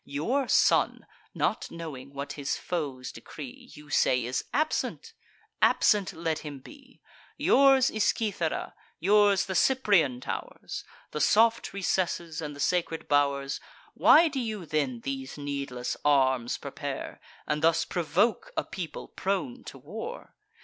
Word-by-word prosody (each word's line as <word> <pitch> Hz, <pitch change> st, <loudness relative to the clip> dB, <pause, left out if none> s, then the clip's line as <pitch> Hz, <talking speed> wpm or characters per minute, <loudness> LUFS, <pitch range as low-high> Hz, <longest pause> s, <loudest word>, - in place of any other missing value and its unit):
Your 240 Hz, -, -1 dB
son, -, -, +3 dB, 0.3 s
not -, -, 0 dB
knowing 140 Hz, -5 st, -8 dB
what 140 Hz, 0 st, -5 dB
his 140 Hz, -1 st, -2 dB
foes 140 Hz, -7 st, -4 dB
decree, 250 Hz, -1 st, -10 dB
You 150 Hz, -1 st, -13 dB
say, 125 Hz, -3 st, +3 dB
is 125 Hz, +1 st, -2 dB
absent: 310 Hz, +4 st, -1 dB, 0.5 s
absent 205 Hz, -3 st, +4 dB
let 160 Hz, -1 st, -2 dB
him 145 Hz, -2 st, -7 dB
be. 265 Hz, -, -16 dB, 0.4 s
Yours 270 Hz, -1 st, +5 dB
is 215 Hz, -1 st, +1 dB
Cythera, 200 Hz, -8 st, -1 dB, 0.3 s
yours 200 Hz, +1 st, +4 dB
the 190 Hz, -, -4 dB
Cyprian 190 Hz, -, +3 dB
tow'rs, -, -, -6 dB, 0.3 s
The 150 Hz, -, -3 dB
soft 230 Hz, +2 st, +4 dB
recesses, 175 Hz, -4 st, -1 dB
and 150 Hz, -2 st, -5 dB
the -, -, -12 dB
sacred 165 Hz, +1 st, 0 dB
bow'rs. 140 Hz, -1 st, +1 dB, 0.3 s
Why 330 Hz, +2 st, +7 dB
do 280 Hz, -3 st, -3 dB
you 215 Hz, -6 st, -4 dB
then 140 Hz, -6 st, -1 dB
these 135 Hz, +1 st, -5 dB
needless 140 Hz, -3 st, -4 dB
arms 130 Hz, -4 st, +2 dB
prepare, -, -, -6 dB, 0.2 s
And 150 Hz, -, -1 dB
thus 165 Hz, 0 st, +3 dB
provoke 190 Hz, -, 0 dB
a -, -, +1 dB
people 175 Hz, -4 st, -6 dB
prone 200 Hz, +7 st, -3 dB
to -, -, -9 dB
war? 475 Hz, +2 st, -8 dB
165 Hz, 135 wpm, -28 LUFS, 140-215 Hz, 0.5 s, Why